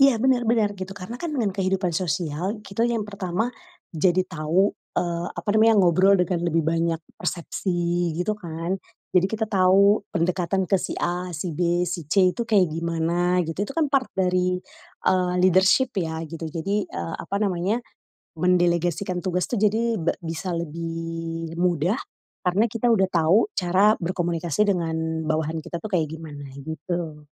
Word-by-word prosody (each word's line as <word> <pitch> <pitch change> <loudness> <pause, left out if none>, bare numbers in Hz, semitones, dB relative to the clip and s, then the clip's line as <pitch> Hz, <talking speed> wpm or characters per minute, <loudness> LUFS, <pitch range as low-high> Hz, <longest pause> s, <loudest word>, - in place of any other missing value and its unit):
Iya, 275 -1 +7
bener 260 -2 +3
bener 220 -3 +3
gitu. 190 0 -5
Karna 210 +6 -7
kan 310 +1 -4
dengan 225 -7 +1
kehidupan 190 -1 0
sosial, 170 +4 -2
kita 225 +4 0
yang 235 -2 0
pertama 200 +2 -2 0.4
jadi 180 +3 +3
tau, 165 +4 +1 0.2
eee, 170 0 -1
apa 170 +4 -7
namanya, 225 +1 +6
ngobrol 185 +3 +5
dengan 180 -1 0
lebih 165 -1 +2
banyak 165 0 0 0.2
persepsi 175 -1 -1
gitu 180 +5 0
kan. 170 0 -3 0.4
Jadi, 185 0 +4
kita 220 0 -1
tau 195 +1 +4
pendekatan 180 +2 0
ke 195 - +5
si - - -4
A, 180 +1 -2
si 170 +3 -3
B, 175 0 +2
si 170 -1 -4
C 185 +3 +4
itu 235 - -3
kayak 200 -6 +4
gimana 170 +2 0
gitu. 165 +2 -6
Itu 275 - -7
kan 320 -3 +1
part 275 -2 +2
dari, 180 -1 +1 0.5
eee, 180 -1 +3
leadership 190 +8 +4
ya 160 -2 -2
gitu. 165 +1 -6
Jadi, 195 +6 -2
eee, 85 -1 -5
apa 200 +4 -4
namanya, 195 +3 0 0.6
mendelegasikan 175 +1 +1
tugas 180 -1 -1
tuh 235 -5 -2
jadi 220 +1 +2
be 165 - 0
bisa 165 +2 -3
lebih 165 0 -4
mudah. 180 - +1 0.4
Karna 185 +4 +2
kita 230 +1 0
udah 205 -5 +4
tau 170 - +4
cara 190 +4 +3
berkomunikasi 175 0 0
dengan 160 -2 -2
bawahan 160 +1 -1
kita 170 - -6
tuh 215 +5 -7
kayak 160 -5 +1
gimana 145 -3 -9 0.2
gitu. 160 -1 -5
180 Hz, 160 wpm, -24 LUFS, 165-195 Hz, 0.6 s, Iya